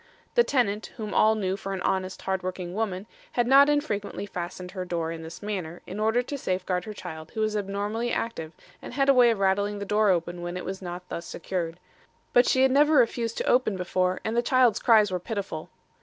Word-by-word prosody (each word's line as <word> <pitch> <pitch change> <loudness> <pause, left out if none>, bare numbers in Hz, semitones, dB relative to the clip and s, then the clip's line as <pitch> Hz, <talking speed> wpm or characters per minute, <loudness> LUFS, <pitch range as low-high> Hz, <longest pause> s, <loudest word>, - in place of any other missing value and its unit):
"'The 475 - +5
tenant 220 - 0
whom 215 -2 -5
all 220 +1 +4
knew 190 -3 -1
for 195 0 -5
an 185 - -5
honest, 190 0 -1
hard 190 -1 -1
working 180 -1 -5
woman, 200 -2 -2 0.3
had 240 - +2
not 275 +3 +7
infrequently 215 -10 -1
fastened 180 -1 -6
her 185 -1 -4
door 170 -2 -2
in 165 -1 -6
this 165 +4 -9
manner, 180 -5 -4
in 195 - -6
order 220 +3 +2
to 285 +3 -5
safeguard 185 -3 -1
her 215 - -6
child 160 -4 -8
who 220 - -2
was 215 0 0
abnormally 205 +4 -2
active 165 -9 -3 0.3
and - - -8
had 275 0 +2
a - - +8
way 250 -2 +6
of 225 - +1
rattling 200 +1 +1
the 200 - -4
door 210 +1 +3
open 175 -1 0
when 175 +1 -4
it 180 - -6
was 190 +1 -5
not 180 0 -7
thus 170 - -5
secured. 170 -1 -4 0.5
But 245 0 +5
she 260 - +4
had 265 - +4
never 295 +3 +4
refused 230 -3 +2
to - - -1
open 245 -6 +3
before, 185 0 0
and 220 - -1
the 240 - +3
child's 245 -3 +3
cries 215 -4 +5
were 180 - -1
pitiful. 190 -5 -5
200 Hz, 220 wpm, -26 LUFS, 180-230 Hz, 0.5 s, a